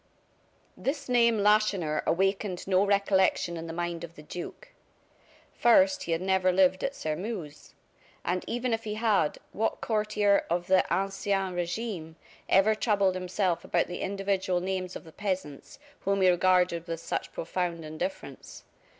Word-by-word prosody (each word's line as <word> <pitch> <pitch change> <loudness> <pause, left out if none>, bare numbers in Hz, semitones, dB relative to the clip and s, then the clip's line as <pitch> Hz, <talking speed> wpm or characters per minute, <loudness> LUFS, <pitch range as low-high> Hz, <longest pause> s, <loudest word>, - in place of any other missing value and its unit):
This 280 +1 -3
name 235 -2 +4
Lacheneur 205 -7 +2
awakened 195 +1 0
no 190 0 +4
recollection 195 -3 +2
in 165 0 -6
the - - -5
mind 170 0 -3
of 170 0 -9
the 150 - -12
duke. 180 - -8 0.8
First, 285 +4 +4
he - - -3
had 165 +1 0
never 190 -1 +2
lived 185 0 +3
at 275 - -2
Sairmeuse. 160 -1 -5 0.5
And 180 +1 -1
even 245 0 -1
if 225 0 -2
he 210 -1 -4
had, 215 -9 +1
what 225 - -1
courtier 210 -2 +1
of 175 +1 0
the 185 +1 +4
ancien 195 0 0
regime 175 -2 -4 0.3
ever 200 +3 +5
troubled 205 -3 +2
himself 185 -1 -1
about 175 - +1
the 175 - -6
individual 195 -2 -1
names 185 0 -3
of - - -7
the 160 - -14
peasants, 185 -7 -4 0.2
whom 195 0 0
he 185 - +6
regarded 180 -1 +2
with 165 -1 -4
such - - -4
profound 170 -1 -3
indifference. 155 - -6
190 Hz, 150 wpm, -28 LUFS, 175-210 Hz, 0.8 s, he